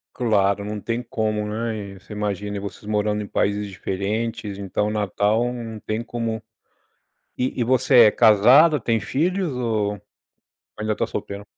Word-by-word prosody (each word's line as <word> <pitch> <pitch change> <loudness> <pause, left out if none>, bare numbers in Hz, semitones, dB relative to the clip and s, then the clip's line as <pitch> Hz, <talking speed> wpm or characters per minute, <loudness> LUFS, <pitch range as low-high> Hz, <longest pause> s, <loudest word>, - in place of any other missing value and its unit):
Claro, 100 -4 +1
não 105 -1 -5
tem 115 +1 -2
como, 110 -3 -2
né? 105 -2 -4
Você 105 - -12
imagina, 105 0 -3
e - - -3
vocês 100 +1 -8
morando 105 0 0
em 100 - -6
países 105 +1 0
diferentes, 105 +2 -3
então 100 +1 -2
o - - -2
Natal 105 +3 0
não 115 -3 -6
tem 110 +3 -3
como. 115 -2 -4 0.9
E 125 0 -2
e - - +2
você 125 0 +5
é 105 - +7
casada, 130 +9 +6
tem 115 0 +1
filhos 170 - -1
ou 110 -5 -1 0.8
ainda 110 0 -1
está - - -1
solteira? 100 0 -6
110 Hz, 155 wpm, -23 LUFS, 105-115 Hz, 0.9 s, é